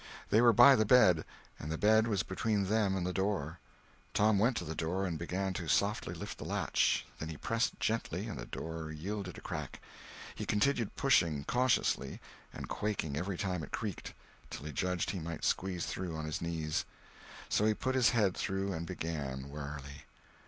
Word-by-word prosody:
They 110 Hz, -, +6 dB
were 120 Hz, -1 st, +7 dB
by 135 Hz, +5 st, +8 dB
the 110 Hz, -, +3 dB
bed, 100 Hz, -8 st, +6 dB, 0.4 s
and 75 Hz, -, -5 dB
the 80 Hz, -, -1 dB
bed 110 Hz, +3 st, +4 dB
was 100 Hz, -4 st, +1 dB
between 100 Hz, +1 st, 0 dB
them 105 Hz, -3 st, +2 dB
and 90 Hz, -, -2 dB
the 90 Hz, -, -2 dB
door. 95 Hz, -5 st, -1 dB, 0.6 s
Tom 105 Hz, -1 st, +4 dB
went 115 Hz, +3 st, +3 dB
to -, -, -2 dB
the 80 Hz, -, -4 dB
door 90 Hz, +4 st, -1 dB
and 85 Hz, -3 st, -2 dB
began 95 Hz, +3 st, -2 dB
to 85 Hz, -2 st, -4 dB
softly 100 Hz, +8 st, +1 dB
lift -, -, -7 dB
the -, -, -5 dB
latch; -, -, +1 dB
then 80 Hz, -, -4 dB
he 80 Hz, -, -6 dB
pressed 115 Hz, -, -1 dB
gently 110 Hz, -4 st, -1 dB
and 100 Hz, -, -5 dB
the -, -, -7 dB
door 80 Hz, -1 st, -5 dB
yielded 90 Hz, +4 st, -5 dB
a -, -, -9 dB
crack; -, -, -5 dB, 0.5 s
he -, -, -6 dB
continued 115 Hz, 0 st, +1 dB
pushing 85 Hz, -, +3 dB
cautiously, 125 Hz, -, +1 dB, 0.3 s
and -, -, -7 dB
quaking 100 Hz, -9 st, -2 dB
every 90 Hz, +4 st, -2 dB
time 90 Hz, -3 st, -2 dB
it -, -, -7 dB
creaked, 105 Hz, -6 st, -5 dB, 0.3 s
till 70 Hz, -, -7 dB
he 75 Hz, -, -4 dB
judged 90 Hz, +3 st, -1 dB
he 95 Hz, -, -4 dB
might 85 Hz, 0 st, -5 dB
squeeze 90 Hz, -2 st, 0 dB
through 90 Hz, -3 st, -4 dB
on 80 Hz, 0 st, -4 dB
his 75 Hz, -, -3 dB
knees; 80 Hz, -2 st, -1 dB, 0.6 s
so 105 Hz, -, +2 dB
he 110 Hz, 0 st, +3 dB
put 130 Hz, +4 st, -1 dB
his 130 Hz, -3 st, +5 dB
head 105 Hz, -6 st, +2 dB
through 95 Hz, 0 st, -2 dB
and 85 Hz, 0 st, -4 dB
began, 70 Hz, -6 st, -4 dB
warily. 70 Hz, -1 st, -7 dB
95 Hz, 190 wpm, -33 LUFS, 80-105 Hz, 0.6 s, by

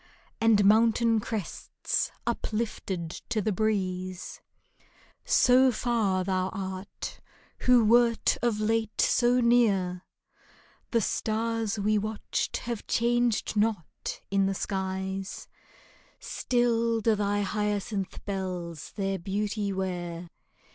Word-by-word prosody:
And 220 Hz, -3 st, +5 dB
mountain 225 Hz, +2 st, +4 dB
crests 210 Hz, -3 st, -3 dB, 0.2 s
uplifted 195 Hz, -6 st, -3 dB, 0.2 s
to 230 Hz, -2 st, 0 dB
the 215 Hz, +1 st, 0 dB
breeze! 185 Hz, -3 st, -2 dB, 0.8 s
So 255 Hz, +1 st, +5 dB
far 215 Hz, -6 st, 0 dB
thou 185 Hz, 0 st, 0 dB
art, 190 Hz, 0 st, -6 dB, 0.4 s
who 245 Hz, -3 st, +5 dB
wert 235 Hz, +1 st, +4 dB
of 230 Hz, -3 st, +1 dB
late 220 Hz, 0 st, 0 dB
so 245 Hz, +1 st, +3 dB
near! 205 Hz, -7 st, +3 dB, 0.9 s
The 230 Hz, -, +2 dB
stars 225 Hz, 0 st, -1 dB
we 210 Hz, +1 st, +2 dB
watched 215 Hz, +1 st, -2 dB
have 235 Hz, -3 st, -4 dB
changed 240 Hz, -1 st, +1 dB
not 210 Hz, -5 st, -1 dB
in 195 Hz, -1 st, +3 dB
the 195 Hz, -, -1 dB
skies; 190 Hz, 0 st, -3 dB, 0.7 s
Still 235 Hz, -2 st, 0 dB
do 225 Hz, +1 st, +3 dB
thy 205 Hz, 0 st, 0 dB
hyacinth 205 Hz, -1 st, -2 dB
bells 180 Hz, -5 st, -4 dB
their 195 Hz, -1 st, -1 dB
beauty 200 Hz, +2 st, -2 dB
wear. 175 Hz, -3 st, -4 dB
210 Hz, 100 wpm, -28 LUFS, 190-230 Hz, 0.9 s, And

